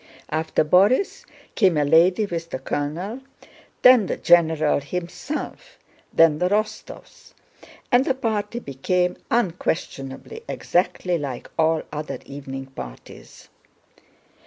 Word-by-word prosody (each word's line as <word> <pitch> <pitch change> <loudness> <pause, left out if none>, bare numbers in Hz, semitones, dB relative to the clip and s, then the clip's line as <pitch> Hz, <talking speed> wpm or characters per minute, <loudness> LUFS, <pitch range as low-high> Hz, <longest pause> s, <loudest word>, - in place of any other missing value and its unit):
After 160 0 0
Borís 200 - +3 0.3
came 185 -7 +3
a 145 - +2
lady 175 +7 +4
with 170 -3 -5
the - - -3
colonel, 160 - -4 0.6
then 250 -6 +7
the - - -2
general 160 -4 +3
himself, 180 - -6 0.3
then 160 -2 +4
the 180 - +1
Rostóvs, 215 - -4 0.6
and 245 +1 +5
the 270 - 0
party 220 -3 -2
became 180 - -1
unquestionably 175 - -2
exactly 180 -1 0
like 135 -4 -6
all 160 -1 +2
other 150 0 -4
evening 135 -1 -7
parties. 65 - -11
175 Hz, 110 wpm, -23 LUFS, 150-210 Hz, 0.6 s, then